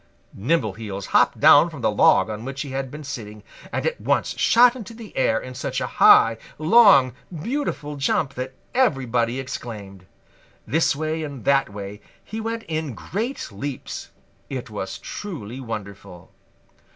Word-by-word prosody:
Nimbleheels 105 - -2
hopped - - +3
down - - +7
from - - -9
the - - +2
log - - +4
on 110 0 -6
which 135 +3 -4
he 140 - -8
had 135 0 -3
been 150 +3 -9
sitting 110 -7 -7 0.3
and - - -2
at 485 0 -2
once - - 0
shot 240 +1 +5
into 230 -2 -9
the 225 -2 -11
air 115 -3 +2
in 130 - -8
such - - -3
a - - -2
high, 115 0 +6 0.2
long, 155 - +6 0.3
beautiful 230 - -3
jump 140 0 0
that 130 +1 -6 0.2
everybody 130 - +1
exclaimed. 100 -7 -7 0.6
This 160 0 +2
way 155 +2 -2
and 140 -6 -7
that 140 -1 +3
way 100 0 -8 0.2
he 220 +1 -6
went 225 0 -3
in 155 - -4
great 225 - -4
leaps. 130 +7 -6 0.4
It 125 -4 -5
was 95 -2 -5
truly 130 - -7
wonderful. 100 -6 -8
135 Hz, 150 wpm, -23 LUFS, 110-160 Hz, 0.6 s, down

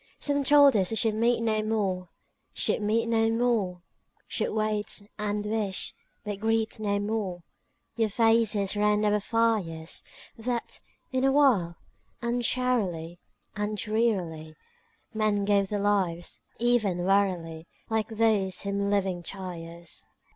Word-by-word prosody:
III - - -32
Some 285 -1 0
told 285 -2 +6
us 190 -3 +2
we 225 - -2
should 220 -1 +2
meet 230 +2 +2
no 220 -1 +1
more, 195 -5 -1 0.5
Should - - +1
meet 220 +2 +1
no 225 -1 +2
more; 225 -7 0 0.4
Should - - -1
wait, 215 -1 -1 0.2
and 210 0 -1
wish, 210 -3 -2 0.3
but 205 -2 -4
greet 220 0 0
no 205 -1 0
more 205 -4 -3 0.5
Your 225 -2 +2
faces 225 -2 +2
round 210 0 +2
our 210 0 +3
fires; 205 -8 0 0.3
That, 235 +1 -3 0.3
in 260 0 0
a 270 - +4
while, 245 -12 +3 0.4
uncharily 235 -8 0 0.4
And 210 0 -2
drearily 185 -8 -1 0.6
Men 215 -2 +1
gave 200 -1 +2
their 210 - -1
lives—even 200 +1 0
wearily, 175 -5 +1 0.2
Like 220 -1 0
those 215 -5 +1
whom 200 0 -1
living 190 -3 0
tires. 170 -2 -7
210 Hz, 125 wpm, -27 LUFS, 190-225 Hz, 0.6 s, told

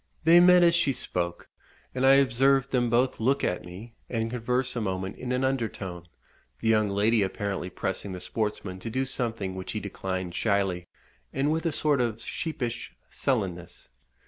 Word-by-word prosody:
They 165 +2 +7
met 180 0 +7
as 170 -1 +5
she 160 -5 +2
spoke, 85 -6 -3 0.5
and 130 +1 +2
I 135 - +8
observed 135 0 +3
them 120 -2 +2
both 125 +3 +2
look 135 +5 +1
at 90 - -1
me, 95 +7 -10 0.2
and 115 -1 -2
converse 125 +1 -1
a 120 - -1
moment 95 -1 -3
in 125 0 -5
an 125 +1 0
under 130 -4 +1
tone, 90 -3 -8 0.5
the 115 - -3
young 110 -2 +3
lady 105 +3 +3
apparently 95 -1 -2
pressing 95 +2 -3
the 90 - -5
sportsman 95 0 -3
to 115 - -5
do 130 +4 -1
something 115 -7 -2
which 95 0 -6
he 110 - -2
declined 95 -3 -4
shyly, 95 -4 0 0.4
and 140 +3 0
with 160 +2 0
a - - +1
sort 145 -3 +2
of 115 -2 -1
sheepish 125 -5 -4 0.2
sullenness. 95 -10 -2
115 Hz, 175 wpm, -27 LUFS, 95-130 Hz, 0.5 s, I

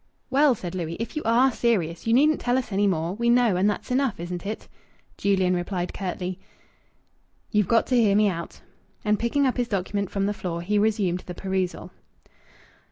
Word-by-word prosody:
"Well," 275 -1 +4
said 180 -4 -6
Louis, 170 -2 -4
"if 230 +7 -5
you 305 - -1
are 240 +4 +4
serious, 200 -8 -1
you 225 - +3
needn't 300 +5 +4
tell 245 +1 +1
us 255 -4 -3
any 200 +1 +2
more. 170 -2 0
We 235 +3 0
know, 240 -4 +4
and 190 +3 +3
that's 210 - -4
enough, 255 -6 +1
isn't 175 +2 -5
it?" 215 - -5 0.5
Julian 190 -2 +1
replied 175 0 -3
curtly, 185 -1 -4 1.1
"You've 210 -4 +2
got 230 -1 +3
to 255 - 0
hear 200 -3 +3
me 210 0 +4
out." 170 -3 -5 0.4
And 210 -1 +2
picking 275 +5 +1
up 260 - 0
his 245 -1 0
document 200 -2 -2
from 195 -1 -1
the 205 - 0
floor, 170 -4 -4
he 205 +3 +1
resumed 205 -4 +1
the 180 - -6
perusal. 190 -1 -3
205 Hz, 190 wpm, -25 LUFS, 180-235 Hz, 1.1 s, Well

